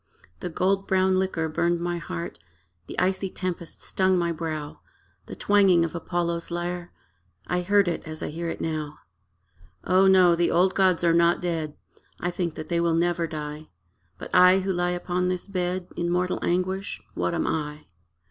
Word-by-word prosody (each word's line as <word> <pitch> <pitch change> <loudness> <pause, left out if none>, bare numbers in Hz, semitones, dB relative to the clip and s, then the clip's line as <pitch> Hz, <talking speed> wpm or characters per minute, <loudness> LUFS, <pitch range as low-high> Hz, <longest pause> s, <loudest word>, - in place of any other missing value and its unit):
The - - -4
gold 195 +3 0
brown 190 0 +3
liquor 180 -4 -1
burned 170 +2 0
my 175 0 -2
heart, 85 - -6 0.5
The - - -8
icy 190 +1 +1
tempest 180 -3 -4
stung 185 -1 +2
my 170 -1 +1
brow: 155 -2 -5 0.5
The - - -7
twanging 195 -4 +4
of 165 - -5
Apollo's 170 0 -2
lyre 175 0 -4 0.5
I 180 0 -1
heard 200 +1 +3
it 170 - -1
as 155 0 -6
I - - -3
hear 170 +2 -4
it - - -5
now. 155 -2 -3 0.9
O 185 +1 +4
no, 185 -2 +6
the 170 0 +2
old 185 +2 +3
gods 185 -3 +3
are 170 -1 +4
not 170 0 +4
dead: 165 -4 -2 0.4
I 175 - -1
think 175 -2 -3
that 155 - -7
they 170 - 0
will 170 -1 +2
never 170 0 +1
die; 150 -1 -6 0.5
But, - - -9
I, 180 +1 +7
who 190 0 -1
lie 175 0 0
upon 180 0 -1
this 180 +1 -2
bed 185 -1 -2
In 170 0 -1
mortal 180 +1 0
anguish 185 +2 -1
what 170 - -1
am 165 - 0
I? 150 -1 -3
175 Hz, 175 wpm, -25 LUFS, 165-185 Hz, 0.9 s, I